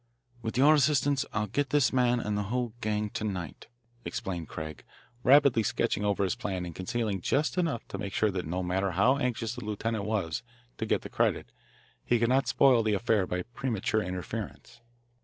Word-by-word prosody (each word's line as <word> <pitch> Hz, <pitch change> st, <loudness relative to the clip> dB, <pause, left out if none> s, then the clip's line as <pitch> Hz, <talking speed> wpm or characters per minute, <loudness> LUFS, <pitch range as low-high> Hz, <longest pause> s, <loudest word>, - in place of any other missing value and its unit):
"With 115 Hz, +1 st, -4 dB
your 145 Hz, +4 st, +7 dB
assistance 145 Hz, -1 st, +3 dB
I'll 105 Hz, 0 st, 0 dB
get 140 Hz, +7 st, -1 dB
this 145 Hz, -3 st, +3 dB
man 125 Hz, -1 st, +3 dB
and 105 Hz, -2 st, -2 dB
the 105 Hz, -, 0 dB
whole 120 Hz, -2 st, -1 dB
gang 105 Hz, 0 st, -1 dB
to -, -, -4 dB
night," 90 Hz, -9 st, -5 dB, 0.4 s
explained 85 Hz, -4 st, -4 dB
Craig, 80 Hz, -2 st, -7 dB, 0.4 s
rapidly 140 Hz, -2 st, +5 dB
sketching 105 Hz, -1 st, 0 dB
over 100 Hz, -1 st, +1 dB
his 95 Hz, -, +1 dB
plan 95 Hz, -6 st, -3 dB
and 85 Hz, -, -7 dB
concealing 100 Hz, +2 st, -2 dB
just 145 Hz, -, +1 dB
enough 165 Hz, -, -1 dB
to 100 Hz, -, -5 dB
make 100 Hz, -2 st, -5 dB
sure 110 Hz, -1 st, +2 dB
that 90 Hz, -4 st, -3 dB
no 90 Hz, +3 st, -2 dB
matter 95 Hz, +1 st, 0 dB
how 120 Hz, +10 st, +4 dB
anxious 120 Hz, -3 st, -1 dB
the 125 Hz, -1 st, -7 dB
lieutenant 105 Hz, 0 st, -2 dB
was 105 Hz, -2 st, -1 dB, 0.4 s
to 110 Hz, -, -2 dB
get -, -, +1 dB
the -, -, -7 dB
credit -, -, 0 dB, 0.5 s
he 120 Hz, -, +2 dB
could 115 Hz, +1 st, +1 dB
not 135 Hz, +2 st, +2 dB
spoil 130 Hz, -4 st, +5 dB
the 110 Hz, -2 st, +1 dB
affair 105 Hz, -3 st, +1 dB
by 90 Hz, 0 st, -2 dB
premature 110 Hz, -3 st, -1 dB
interference. 105 Hz, +5 st, -6 dB
110 Hz, 190 wpm, -29 LUFS, 95-125 Hz, 0.5 s, your